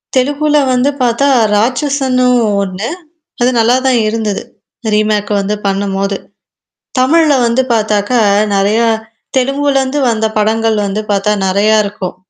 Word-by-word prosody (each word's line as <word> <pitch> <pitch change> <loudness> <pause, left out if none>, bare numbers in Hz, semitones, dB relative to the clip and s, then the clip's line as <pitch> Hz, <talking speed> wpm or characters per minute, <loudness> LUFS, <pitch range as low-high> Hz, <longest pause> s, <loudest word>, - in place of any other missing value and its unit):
தெலுகுல 290 +3 +1 0.2
வந்து 255 +3 +2
பாத்தா 245 +3 +1 0.3
ராட்சன்னும் 255 +1 +1 0.2
ஒண்ணு. 195 +5 -4 0.5
அது 245 - +3
நல்லா 230 +2 +3
தான் 250 -3 +3
இருந்தது. 215 -2 -2 0.5
ரீமேக் 210 -1 0
வந்து 200 +2 -2
பண்ணும்போது. 195 0 -1 0.8
தமிழ்ல 305 +3 +3
வந்து 235 +2 +1
பாத்தாக்கா, 215 +2 0 0.3
நெறையா 205 +4 +2 0.5
தெலுங்குலருந்து 275 +1 0
வந்த 220 -1 0
படங்கள் 220 +1 +1
வந்து 200 +2 -2
பாத்தா 200 +1 +1
நெறையா 200 +3 +2
இருக்கும். 195 -3 -6
225 Hz, 110 wpm, -13 LUFS, 205-260 Hz, 0.8 s, அது